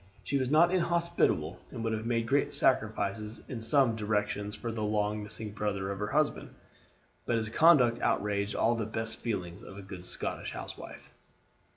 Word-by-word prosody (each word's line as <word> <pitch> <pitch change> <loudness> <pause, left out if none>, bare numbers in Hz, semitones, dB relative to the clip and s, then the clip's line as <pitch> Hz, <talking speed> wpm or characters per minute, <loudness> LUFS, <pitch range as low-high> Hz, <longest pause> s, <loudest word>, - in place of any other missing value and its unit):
She 140 - 0
was 130 -1 -1
not 170 +5 +5
inhospitable, 170 - +1
and 115 -3 -6
would 115 -1 0
have 110 +1 -3
made 115 -1 +1
great 140 +4 +1
sacrifices 110 -2 0
in 120 -3 -5
some 130 -1 +4
directions 105 -1 -1
for 115 - -4
the 110 -1 -4
long 105 0 0
missing 105 0 -4
brother 100 -2 -2
of 100 - -5
her 105 - -1
husband; 150 +5 0 0.7
but 120 - +2
his 110 -1 -1
conduct 125 -4 +5
outraged 100 0 0
all 115 - +3
the 115 -3 -2
best 110 0 -3
feelings 95 -5 -4
of 95 - -11
a 100 - -8
good 95 -2 -9
Scotch - - -3
housewife. - - -9
110 Hz, 175 wpm, -30 LUFS, 105-120 Hz, 0.7 s, not